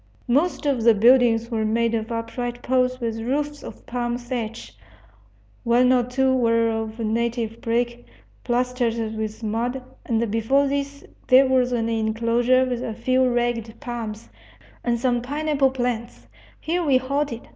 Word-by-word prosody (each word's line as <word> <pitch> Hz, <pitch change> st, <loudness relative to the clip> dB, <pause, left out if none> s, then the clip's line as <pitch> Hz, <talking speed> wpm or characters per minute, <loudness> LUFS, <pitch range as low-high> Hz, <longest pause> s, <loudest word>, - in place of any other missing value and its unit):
Most 295 Hz, +7 st, +1 dB
of 275 Hz, -5 st, +1 dB
the 230 Hz, -1 st, +6 dB
buildings 235 Hz, +1 st, +4 dB
were 220 Hz, -1 st, 0 dB
made 230 Hz, +2 st, +1 dB
of 225 Hz, 0 st, -2 dB
upright 240 Hz, +1 st, -4 dB
poles 255 Hz, 0 st, +1 dB
with 225 Hz, -2 st, -3 dB
roofs 290 Hz, +5 st, -2 dB
of -, -, -11 dB
palm 240 Hz, 0 st, -2 dB
thatch. 240 Hz, -2 st, -6 dB, 0.9 s
One 250 Hz, +1 st, +4 dB
or 250 Hz, -, +4 dB
two 260 Hz, +2 st, +1 dB
were 230 Hz, -2 st, +2 dB
of 225 Hz, 0 st, -4 dB
native 230 Hz, 0 st, -2 dB
brick, 240 Hz, +1 st, -2 dB, 0.4 s
plastered 245 Hz, -1 st, 0 dB, 0.2 s
with 220 Hz, +1 st, -5 dB
mud, 235 Hz, +4 st, -2 dB, 0.2 s
and 230 Hz, -2 st, -1 dB
before 230 Hz, +6 st, +2 dB
these 280 Hz, 0 st, -3 dB, 0.2 s
there 260 Hz, +2 st, +7 dB
was 255 Hz, -1 st, +2 dB
an 230 Hz, -2 st, 0 dB
enclosure 230 Hz, +3 st, +2 dB
with 245 Hz, -2 st, -3 dB
a 235 Hz, -4 st, -4 dB
few 255 Hz, +2 st, +2 dB
ragged 240 Hz, -2 st, -2 dB
palms, 230 Hz, -5 st, -6 dB, 0.6 s
and 240 Hz, -1 st, 0 dB
some 245 Hz, -1 st, +1 dB
pineapple 290 Hz, +1 st, +1 dB
plants. 235 Hz, -, -3 dB, 0.3 s
Here 345 Hz, +3 st, -1 dB
we 280 Hz, -5 st, +4 dB
halted. 260 Hz, -2 st, -2 dB
240 Hz, 145 wpm, -23 LUFS, 230-255 Hz, 0.9 s, there